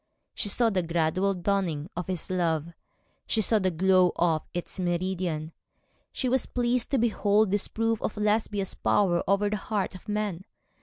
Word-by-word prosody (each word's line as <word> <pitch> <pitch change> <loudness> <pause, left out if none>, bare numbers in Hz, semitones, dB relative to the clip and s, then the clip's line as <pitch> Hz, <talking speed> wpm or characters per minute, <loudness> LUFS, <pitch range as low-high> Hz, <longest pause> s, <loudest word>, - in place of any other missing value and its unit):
She 205 - -2
saw 230 +2 +2
the 190 -2 +1
gradual 170 +4 0
dawning 175 -5 -1
of 180 -1 -4
his 185 -1 -3
love, 170 -2 0 0.5
she 225 - +1
saw 220 +1 +3
the 190 -2 +1
glow 185 +1 +3
of 165 -2 +2
its 175 +2 -5
meridian. 175 -3 -2 0.6
She 260 - -2
was 255 0 +1
pleased 245 0 0
to 275 - +1
behold 215 -3 +2
this 205 0 +1
proof 225 0 -1
of 210 - -3
Lesbia's 210 -2 0
power 175 -4 +2
over 200 +1 +2
the 210 +1 -1
heart 205 -1 -2
of 185 +3 -11
man. 205 -4 -2
190 Hz, 165 wpm, -27 LUFS, 175-210 Hz, 0.6 s, saw